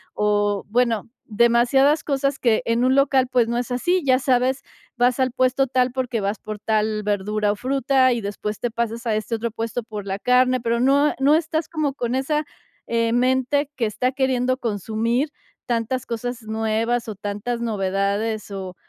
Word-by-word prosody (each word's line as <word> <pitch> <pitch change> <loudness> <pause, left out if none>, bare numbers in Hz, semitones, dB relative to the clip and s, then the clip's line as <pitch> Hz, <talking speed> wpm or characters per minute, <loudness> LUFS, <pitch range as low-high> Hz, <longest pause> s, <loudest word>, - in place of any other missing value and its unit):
o, 205 -1 +1
bueno, 235 -1 +1 0.2
demasiadas 240 +6 +3
cosas 275 -1 -1
que 230 -3 +2
en 230 +1 +1
un 260 +1 +3
local, 270 -2 +3
pues, 245 -2 +2
no 235 +1 -1
es 245 - -4
así. 350 +9 +1
Ya 260 -2 +4
sabes, 260 0 +1 0.3
vas 245 +1 +2
al 260 -1 +2
puesto 255 +2 +1
tal 255 0 +1
porque 250 -3 -2
vas 200 +1 -2
por 215 -1 -6
tal 215 0 0
verdura 210 +1 0
o 205 - -2
fruta 260 +1 +2
y 240 - -2
después 205 0 -4
te 240 - -2
pasas 230 0 -3
a 225 - +1
este 215 +2 -2
otro 230 +1 -3
puesto 230 +1 -4
por 210 -2 -7
la 195 0 -2
carne, 255 +3 +3
pero 235 0 0
no 280 +4 +4
e - - -4
no 280 +3 +5
estás 320 0 -1
como 305 -4 -1
con 245 -2 -2
esa, 300 +3 0 0.4
eh, 230 0 +1
mente 260 +3 +1
que 240 - 0
está 235 +4 -1
queriendo 255 -1 0
consumir 230 - -1 0.4
tantas 235 +1 -1
cosas 245 +1 -4
nuevas 225 +2 -1
o 215 - -4
tantas 205 +4 -4
novedades, 205 0 -1
o 190 -2 -6
240 Hz, 180 wpm, -22 LUFS, 215-260 Hz, 0.4 s, no